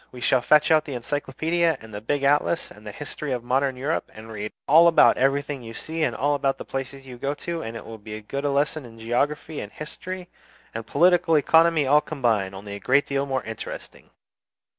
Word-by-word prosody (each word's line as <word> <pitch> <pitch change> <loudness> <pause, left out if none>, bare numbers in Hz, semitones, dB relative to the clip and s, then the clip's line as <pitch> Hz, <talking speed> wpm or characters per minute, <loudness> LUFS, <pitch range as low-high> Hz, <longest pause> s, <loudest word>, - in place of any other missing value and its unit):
We 125 - -10
shall 130 +1 +2
fetch 150 +4 +4
out 155 -1 +4
the 140 - -5
Encyclopaedia 155 +6 0
and 110 -1 -13
the 105 - -6
big 140 +5 -1
Atlas 145 +4 +1
and 105 +1 -14
the - - -5
'History 145 +4 -6
of 125 -2 -2
Modern 130 +2 +1
Europe,' 145 +6 -2
and 110 +1 -10
read 105 -1 -5 0.2
all 165 +4 +7
about 170 - +6
everything 140 +1 0
you 115 -1 -9
see 160 +6 -5
and - - +1
all 145 +1 +1
the 135 0 -1
places 135 0 -6
you 125 -2 -10
go 140 +3 -2
to; 170 +3 -4
and 115 -3 -6
it - - -10
will 115 -1 -9
be 105 +1 -8
as 110 - -11
good 140 +1 -3
as 145 - +1
a - - 0
lesson 145 +2 0
in 115 -2 -13
geography 140 +7 -1
and 105 - -8
history 180 +4 -7 0.5
and 115 0 -6
political 175 +2 +4
economy 160 0 +4
all 145 +3 +5
combined, 110 -11 -1
only 100 +1 -8
a 100 - -6
great 135 +7 +3
deal 140 0 -1
more 130 -3 -1
interesting! 110 -1 -8
140 Hz, 220 wpm, -24 LUFS, 115-150 Hz, 0.5 s, all